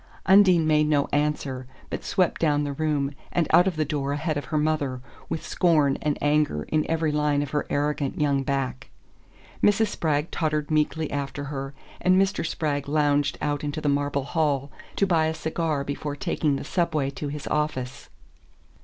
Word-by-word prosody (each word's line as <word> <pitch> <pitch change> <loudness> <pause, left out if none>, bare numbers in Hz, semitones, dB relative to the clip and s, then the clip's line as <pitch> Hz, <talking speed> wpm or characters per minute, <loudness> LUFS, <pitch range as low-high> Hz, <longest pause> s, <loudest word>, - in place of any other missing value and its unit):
Undine 190 -4 +6
made 150 -1 +3
no 145 -2 +2
answer, 145 -3 -1 0.2
but - - -4
swept 185 -3 0
down 150 -2 +2
the 145 -1 -3
room, 145 -2 0 0.2
and 170 - +1
out 175 +3 +6
of 185 - 0
the 155 0 0
door 140 -1 -2
ahead 155 +2 -1
of 145 - -3
her 155 - -2
mother, 150 -4 0 0.3
with 160 - -3
scorn 150 -6 +3
and 150 -1 0
anger 145 - +2
in 155 -1 0
every 160 -1 +1
line 150 -1 +1
of 145 - -7
her 150 - -1
arrogant 145 -1 -1
young 140 -2 +2
back. 135 -1 -3 0.7
Mrs. 205 +1 +3
Spragg 155 -4 -1
tottered 155 -2 -1
meekly 155 0 0
after 145 0 -3
her, 135 -1 -5 0.3
and 185 +1 +4
Mr. 195 0 +1
Spragg 145 -4 -2
lounged 145 -1 +2
out 145 0 -1
into 145 +1 -3
the 155 - -3
marble 140 -1 0
hall 145 -2 0 0.2
to 200 - +2
buy 165 -4 +2
a 160 - -2
cigar 160 -2 -1
before 145 +1 -4
taking 145 0 0
the - - -4
Subway 155 -6 0
to 145 - -5
his 145 0 -6
office. 140 -3 -2
150 Hz, 180 wpm, -25 LUFS, 140-155 Hz, 0.7 s, Undine